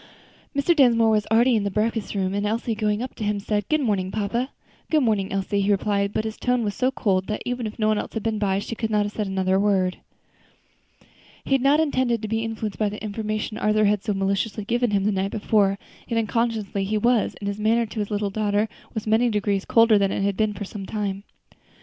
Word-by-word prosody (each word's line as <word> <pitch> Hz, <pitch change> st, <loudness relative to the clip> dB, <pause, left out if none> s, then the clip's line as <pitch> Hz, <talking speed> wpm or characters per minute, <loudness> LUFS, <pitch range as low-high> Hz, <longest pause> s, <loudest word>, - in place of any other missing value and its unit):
Mr. 285 Hz, +5 st, +3 dB
Dinsmore 230 Hz, -6 st, +5 dB
was 210 Hz, -1 st, +1 dB
already 235 Hz, +3 st, +4 dB
in 215 Hz, -, +2 dB
the 200 Hz, -, 0 dB
breakfast 215 Hz, +1 st, -1 dB
room, 190 Hz, -1 st, 0 dB
and 205 Hz, 0 st, -1 dB
Elsie, 225 Hz, +2 st, -1 dB
going 210 Hz, +1 st, 0 dB
up 255 Hz, -, -6 dB
to 220 Hz, -, -6 dB
him, 205 Hz, 0 st, 0 dB
said, 205 Hz, 0 st, -2 dB
"Good 310 Hz, -1 st, +2 dB
morning, 200 Hz, -7 st, 0 dB
papa." 220 Hz, +6 st, -2 dB, 0.4 s
"Good 310 Hz, -3 st, +3 dB
morning, 210 Hz, -5 st, +1 dB
Elsie," 195 Hz, +1 st, 0 dB
he 195 Hz, -, 0 dB
replied, 200 Hz, 0 st, +1 dB
but 215 Hz, -, -1 dB
his 220 Hz, 0 st, -5 dB
tone 250 Hz, -1 st, 0 dB
was 205 Hz, -2 st, -1 dB
so 255 Hz, +3 st, +1 dB
cold 190 Hz, -7 st, 0 dB
that 215 Hz, -, -3 dB
even 245 Hz, -2 st, -2 dB
if 210 Hz, -, -8 dB
no 215 Hz, -1 st, +1 dB
one 215 Hz, -1 st, +2 dB
else -, -, -6 dB
had 220 Hz, -, -3 dB
been 220 Hz, -2 st, -1 dB
by, 195 Hz, -2 st, +1 dB
she 200 Hz, -, -4 dB
could 225 Hz, -1 st, -3 dB
not 210 Hz, -1 st, +2 dB
have 205 Hz, -, -4 dB
said 210 Hz, -1 st, -3 dB
another 190 Hz, 0 st, +1 dB
word. 190 Hz, -3 st, +1 dB, 1.5 s
He -, -, -8 dB
had 270 Hz, -1 st, +4 dB
not 280 Hz, +3 st, +4 dB
intended 255 Hz, -7 st, +1 dB
to -, -, -2 dB
be 225 Hz, +1 st, -1 dB
influenced 220 Hz, -2 st, -4 dB
by 210 Hz, -1 st, +2 dB
the 210 Hz, +1 st, -8 dB
information 215 Hz, 0 st, -3 dB
Arthur 215 Hz, 0 st, +2 dB
had 205 Hz, -1 st, +2 dB
so 210 Hz, -3 st, -1 dB
maliciously 200 Hz, +2 st, -1 dB
given 240 Hz, +2 st, +1 dB
him 200 Hz, -2 st, +1 dB
the 210 Hz, -, +2 dB
night 195 Hz, 0 st, -1 dB
before; 205 Hz, -2 st, +1 dB, 0.3 s
yet 230 Hz, -, -1 dB
unconsciously 220 Hz, -3 st, -1 dB
he 210 Hz, +2 st, 0 dB
was, 235 Hz, +1 st, +2 dB
and 200 Hz, -, -6 dB
his 200 Hz, +1 st, -3 dB
manner 225 Hz, +2 st, +2 dB
to 220 Hz, 0 st, -7 dB
his 205 Hz, -, -2 dB
little 205 Hz, -1 st, -1 dB
daughter 210 Hz, +1 st, 0 dB, 0.3 s
was 220 Hz, -, -3 dB
many 225 Hz, +3 st, +3 dB
degrees 205 Hz, -2 st, 0 dB
colder 230 Hz, -2 st, +5 dB
than 195 Hz, -1 st, +1 dB
it -, -, -1 dB
had 200 Hz, 0 st, 0 dB
been 215 Hz, 0 st, 0 dB
for 205 Hz, +1 st, -5 dB
some 195 Hz, -1 st, -7 dB
time. 200 Hz, -2 st, -3 dB
215 Hz, 235 wpm, -24 LUFS, 200-225 Hz, 1.5 s, Dinsmore